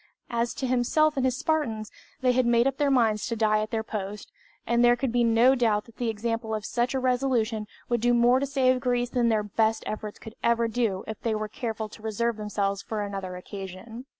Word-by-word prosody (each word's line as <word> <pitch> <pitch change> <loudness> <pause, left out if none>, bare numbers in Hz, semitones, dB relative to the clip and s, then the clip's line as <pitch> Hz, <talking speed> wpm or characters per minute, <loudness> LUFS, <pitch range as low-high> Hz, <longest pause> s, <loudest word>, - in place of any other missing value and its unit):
As 235 0 -1
to 265 - -3
himself 255 +5 +2
and 265 - 0
his 255 -1 +1
Spartans, 240 -10 -1 0.3
they 255 -1 +4
had 250 -1 +2
made 235 0 +4
up 270 0 0
their 290 -2 +2
minds 225 -5 +2
to 230 - -2
die 215 -1 +2
at 215 - -3
their 225 -1 -2
post, 210 -1 -6 0.3
and 235 +1 +2
there 240 0 +6
could 250 0 -2
be 240 0 +2
no 230 +3 +5
doubt 225 -5 +1
that 230 - -18
the 240 -2 -1
example 225 0 -2
of 215 -1 -5
such 245 +2 -1
a - - +1
resolution 245 -4 0 0.2
would 240 -2 0
do 240 +1 +3
more 240 +2 +5
to 280 - -1
save 260 -2 +2
Greece 245 -1 0
than 240 -2 +2
their 215 -2 +2
best 220 +2 0
efforts 215 -1 -5
could 220 - -11
ever 235 0 +2
do 225 -5 -1
if 220 - -7
they 225 -2 0
were 215 0 -2
careful 220 0 -4
to 215 - -13
reserve 225 +1 -1
themselves 200 -2 -2
for 215 -2 -3
another 195 -2 -5
occasion. 195 +5 -8
230 Hz, 225 wpm, -26 LUFS, 215-245 Hz, 0.3 s, there